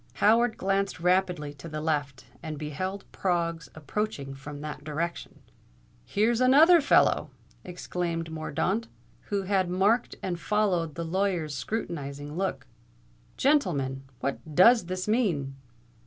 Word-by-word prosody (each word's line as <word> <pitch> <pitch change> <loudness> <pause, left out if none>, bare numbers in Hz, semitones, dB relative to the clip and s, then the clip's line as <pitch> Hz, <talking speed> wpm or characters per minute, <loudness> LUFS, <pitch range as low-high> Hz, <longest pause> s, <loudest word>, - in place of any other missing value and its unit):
Howard 230 +2 +3
glanced 195 0 0
rapidly 180 -4 +1
to 145 +3 -10
the 155 0 -4
left, 145 -4 -2 0.2
and 155 -3 -5
beheld 185 +7 -4
Proggs 170 -3 -1
approaching 155 -2 -3
from 145 +1 -9
that 150 -1 -6
direction. 160 +3 -4 0.6
"Here's 225 - +1
another 310 +7 +7
fellow!" 280 - +3 0.3
exclaimed 175 -2 -4
Mordaunt, 170 +8 -1 0.4
who 200 -1 -1
had 190 -2 +1
marked 200 +7 +2
and 175 -2 -2
followed 180 -7 0
the 170 - -4
lawyer's 175 -3 -1
scrutinizing 145 -4 -4
look. 190 +2 -2 0.7
"Gentlemen, 165 - +1 0.2
what 145 +2 -4
does 230 +4 +6
this 185 +2 -4
mean?" 180 - +1
175 Hz, 120 wpm, -27 LUFS, 150-200 Hz, 0.7 s, another